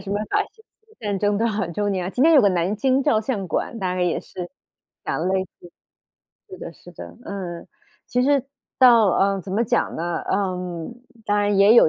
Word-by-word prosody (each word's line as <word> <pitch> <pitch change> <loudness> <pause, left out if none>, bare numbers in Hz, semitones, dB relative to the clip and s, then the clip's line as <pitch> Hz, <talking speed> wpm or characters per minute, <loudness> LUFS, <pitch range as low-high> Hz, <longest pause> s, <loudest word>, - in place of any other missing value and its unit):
什 195 - -10
么 205 - 0
法 - - +2
西 440 - -23
斯 440 0 -30
战 205 -3 -2
争 205 0 +1
多 230 +2 +1
少 210 -5 -1
周 205 +4 -1
年 185 -2 -1
啊？ - - -3
今 250 - 0
年 330 - +6
有 290 - +8
个 200 - +5
《南 175 +4 0
京 265 +4 +2
照 215 -3 +3
相 210 -5 -3
馆》 170 - -2
大 185 -2 -1
概 185 - -2
也 175 -2 +1
是 180 -1 -8 0.6
讲 170 +3 -1
类 190 0 +1
似 175 -2 -17 0.8
是 380 - -9
的， 170 - -7
是 175 - -15
的， - - -10
嗯。 180 -4 -6 0.4
其 250 0 +1
实 280 -1 +3 0.4
到， 235 -4 +7
呃， 195 +1 +2
怎 190 - -7
么 225 +4 +2
讲 240 +1 0
呢？ 170 +1 -2
呃， 185 -3 -1 0.7
当 205 0 +1
然 205 -1 +2
也 205 +3 +7
有 235 - +7
205 Hz, 230 characters per minute, -23 LUFS, 185-235 Hz, 0.8 s, 有